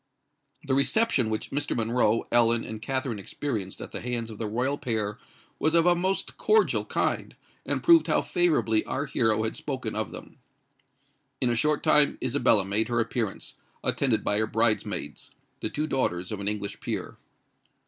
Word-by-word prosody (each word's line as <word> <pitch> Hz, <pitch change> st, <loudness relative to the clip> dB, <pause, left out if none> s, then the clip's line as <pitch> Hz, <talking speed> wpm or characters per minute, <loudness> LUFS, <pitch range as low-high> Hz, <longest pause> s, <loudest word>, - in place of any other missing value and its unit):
The 135 Hz, -, -1 dB
reception 140 Hz, -, +2 dB
which 110 Hz, 0 st, -3 dB
Mr. 145 Hz, +1 st, -1 dB
Monroe, 115 Hz, -1 st, +1 dB
Ellen, 120 Hz, -1 st, +4 dB
and 110 Hz, -1 st, -7 dB
Katherine 130 Hz, -3 st, -2 dB
experienced 100 Hz, -1 st, -4 dB
at -, -, -8 dB
the -, -, -5 dB
hands 120 Hz, -2 st, -3 dB
of 105 Hz, -, -10 dB
the 110 Hz, -, -2 dB
royal 125 Hz, +6 st, -1 dB
pair 110 Hz, -4 st, -2 dB, 0.4 s
was 155 Hz, +2 st, +2 dB
of 165 Hz, 0 st, +4 dB
a 175 Hz, -, +6 dB
most 185 Hz, +3 st, -2 dB
cordial 440 Hz, 0 st, +3 dB
kind, -, -, -1 dB, 0.3 s
and -, -, -1 dB
proved 335 Hz, -1 st, +6 dB
how -, -, +2 dB
favourably 150 Hz, -11 st, +2 dB
our 140 Hz, -, -2 dB
hero 110 Hz, -6 st, +1 dB
had 110 Hz, -, -2 dB
spoken 130 Hz, -6 st, -4 dB
of 110 Hz, -4 st, -2 dB
them. 90 Hz, -, -11 dB, 1.0 s
In 125 Hz, -2 st, +1 dB
a -, -, +1 dB
short 150 Hz, +5 st, +1 dB
time 150 Hz, -1 st, +4 dB
Isabella 120 Hz, -6 st, +2 dB
made 105 Hz, +3 st, +1 dB
her 120 Hz, -1 st, 0 dB
appearance, 115 Hz, -2 st, -2 dB, 0.3 s
attended 125 Hz, -6 st, +1 dB
by 105 Hz, -, +1 dB
her 110 Hz, -, +1 dB
bridemaids—the 110 Hz, 0 st, -2 dB
two 150 Hz, -, -2 dB
daughters 90 Hz, -, -1 dB
of 105 Hz, -, -4 dB
an 100 Hz, -, -4 dB
English 105 Hz, -1 st, -3 dB
peer. -, -, -4 dB
115 Hz, 170 wpm, -27 LUFS, 110-140 Hz, 1.0 s, a